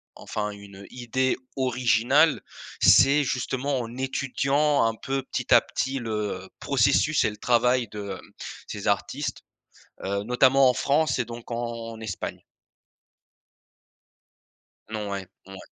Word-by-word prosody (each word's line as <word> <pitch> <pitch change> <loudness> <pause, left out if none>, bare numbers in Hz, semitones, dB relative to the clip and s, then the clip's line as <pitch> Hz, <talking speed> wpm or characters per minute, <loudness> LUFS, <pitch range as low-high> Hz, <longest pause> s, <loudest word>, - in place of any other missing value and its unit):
enfin, 105 -1 -4
une 100 -1 -12
idée 125 +1 -1 0.2
originale, 130 +3 +3 0.4
c'est, 140 +2 +6
justement, 130 +1 -1
en 115 0 -6
étudiant, 135 +2 +1
un 115 - +1
peu, 135 +3 -3
petit - - -1
à - - +8
petit 135 +1 -3
le 105 -5 -4
processus 140 +3 +2
et - - +2
le 105 - -10
travail 125 +1 +2
de, 100 -1 -6
hem, - - -17 0.4
ces - - -6
artistes. - - -1 0.6
Heu, 100 +1 -2
notamment 130 +3 +4
en - - +2
France 145 +3 +1
et 125 - 0
donc 120 +1 -9
en 115 -1 -5
Espagne. 105 -5 -5 2.5
Non 105 -2 -4
ouais. 100 -2 -5 0.2
Mouais. 95 0 -10
120 Hz, 125 wpm, -25 LUFS, 110-135 Hz, 2.5 s, à